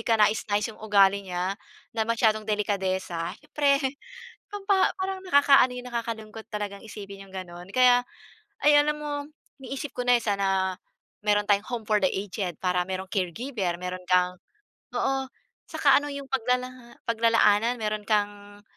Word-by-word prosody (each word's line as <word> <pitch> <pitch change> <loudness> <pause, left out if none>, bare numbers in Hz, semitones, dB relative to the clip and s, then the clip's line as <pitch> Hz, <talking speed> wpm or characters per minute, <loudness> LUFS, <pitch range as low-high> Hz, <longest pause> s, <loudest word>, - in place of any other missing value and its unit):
kanais-nais 210 -2 +2
yung 215 - -18
ugali 200 -2 +4
niya, 180 +1 -1 0.4
na 225 -1 -1
masyadong 220 -2 +2
delikadesa. 190 -4 -1
Siyempre 285 -2 +2 0.7
pampa 400 -2 +1
parang 380 0 -3
nakakaano 280 -5 +6
'yun, 250 - -6
nakakalungkot 225 -2 -5
talagang 205 -2 -5
isipin 200 -2 -10
yung 190 - -13
gano'n. 175 -1 -8
Kaya 250 -1 +6 0.6
ay, 295 - +7
alam 300 +1 0
mo, 290 -1 -4 0.3
iniisip 275 +2 -6
ko - - -5
na, 245 - +7
eh, 235 - -3
sana 195 -2 +1 0.5
meron 210 0 +2
tayong 205 0 +2
home 240 -3 -4
for 210 0 +2
the 190 - +3
aged, 190 -3 -4
para 180 -1 0
mayro'ng 190 0 -4
caregiver, 190 - -2
mayro'n 180 +1 -5
kang 180 0 +2 0.6
oo, 270 0 0 0.4
saka - - +4
ano, 290 - -6
yung 280 -1 -6
paglala 250 -1 -2
paglalaanan. 230 0 +3
Meron 215 -1 -2
kang, 205 -1 -1
215 Hz, 145 wpm, -26 LUFS, 195-250 Hz, 0.7 s, ay